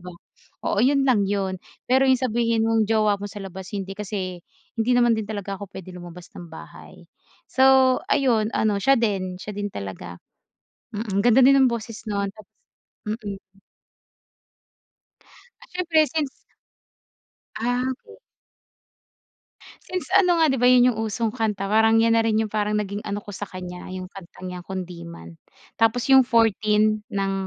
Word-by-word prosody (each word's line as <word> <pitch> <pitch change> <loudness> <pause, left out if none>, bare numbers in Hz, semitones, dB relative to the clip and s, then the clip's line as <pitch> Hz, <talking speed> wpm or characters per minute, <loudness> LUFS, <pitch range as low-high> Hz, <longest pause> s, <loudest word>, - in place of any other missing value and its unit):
ba. 180 0 -10 0.5
Oo - - 0
yun 275 +2 +3
lang 245 -7 +3
yun 190 -2 -2 0.3
pero 260 +1 +4
yung 260 - +5
sabihin 230 -2 +1
mong 225 -2 +1
jowa 215 -2 +2
mo 205 - -5
sa 205 - -8
labas 190 0 -9
hindi 195 -1 -4
kasi, 190 -3 -5 0.3
hindi 225 +1 -1
naman 240 -1 +4
din 220 - -3
talaga 200 -2 -4
ako 200 - -8
pwede 185 -1 -9
lumabas 175 0 -11
ng 175 -1 -10
bahay. 160 - -13 0.4
So 265 -1 +4
ayun, 230 -6 +2
ano 215 -2 +1
siya 270 +6 +4
din 195 -5 -1
siya 210 - -7
din 205 0 -2
talaga. 95 - -7 0.8
Mm, 205 -2 -2
ganda 240 +2 +5
din 275 +2 +6
ang 255 - +4
boses 230 -1 -6
nun 200 -1 -1
tapos 215 -2 -16 0.6
mm. 210 -2 -5 2.2
Ah, - - -15
siyempre 335 -4 +2
since 305 -3 -2 1.3
Ah, 245 +3 -1
okey. 255 - -12 1.7
Since 365 0 -5
ano 380 -2 +4
nga 315 -4 +4
di 265 - 0
ba 245 - +4
yun 250 0 +6
yung 220 - -6
usong 220 0 -1
kanta 205 -3 -2
parang 220 +1 +4
yan 230 - +3
na - - +4
rin 220 -1 +1
yung 215 - -6
parang 210 0 0
naging 205 -1 -2
ano 205 0 -4
ko 205 - -9
sa 205 +1 -6
kanya 180 -1 -8
yung 185 0 -7
kanta 185 -1 -13
niya 180 -1 -6
Kundiman, 170 - -8 0.4
tapos 225 +1 +2
yung 265 -2 +7
14 215 -2 +2
ng 195 -1 -2
215 Hz, 160 wpm, -23 LUFS, 195-240 Hz, 2.2 s, yung